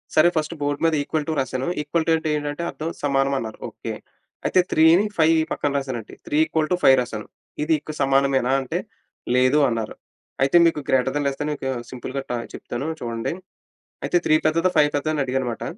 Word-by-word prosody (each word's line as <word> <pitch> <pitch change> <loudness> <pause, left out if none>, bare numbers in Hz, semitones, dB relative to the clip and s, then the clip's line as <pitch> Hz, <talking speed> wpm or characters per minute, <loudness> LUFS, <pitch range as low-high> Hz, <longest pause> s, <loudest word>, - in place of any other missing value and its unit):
సరే 155 +2 +6
first 155 +2 -1
board 145 0 -1
మీద 165 - +3
equal 150 +1 -2
two 160 - 0
రాసాను. 130 0 -2
ఈక్వల్ 160 +2 -1
టూ 165 - +3
అంటే 160 -1 -3
ఏంటంటే? 145 +3 -4
అర్థం 160 +2 -5
సమానం 140 -1 +2
అన్నారు. 110 -1 -7
ఓకే. - - -6 0.5
అయితే 185 - +3
త్రీని, 165 +5 +5
ఫైవ్ 160 0 +5 0.2
పక్కన 145 - -1
రాసానండి. 130 -5 -5
త్రీ 150 - 0
ఈక్వల్ 155 -1 -1
టూ - - +4
ఫైవ్ 135 - +8
రాసాను. 115 -4 -6 0.4
ఇది 160 - +2
ఇక 155 +1 -8
సమానమేనా? 135 -1 +2
అంటే 130 - -3 0.6
లేదూ 130 +4 +4
అన్నారు. 115 -2 -3 0.5
అయితే 135 +5 +4
మీకు 165 -2 +2
గ్రేటర్ 130 0 +2
థాన్, 145 -1 0
లేస్ 135 -1 -3
థాన్ 150 0 -1 0.4
సింపుల్‌గా 130 +2 -5
త - - -1 0.2
చెప్తాను 130 +6 -5
చూడండి. 115 +3 -3 0.7
అయితే - - +2
త్రీ 155 - +4
పెద్దదా? 165 +3 +2
ఫైవ్ 150 -1 +5
పెద్దదా? 155 +2 -1
అని 150 - 0
అడిగాననమాట. 125 -2 -2
145 Hz, 185 wpm, -23 LUFS, 130-155 Hz, 0.7 s, ఫైవ్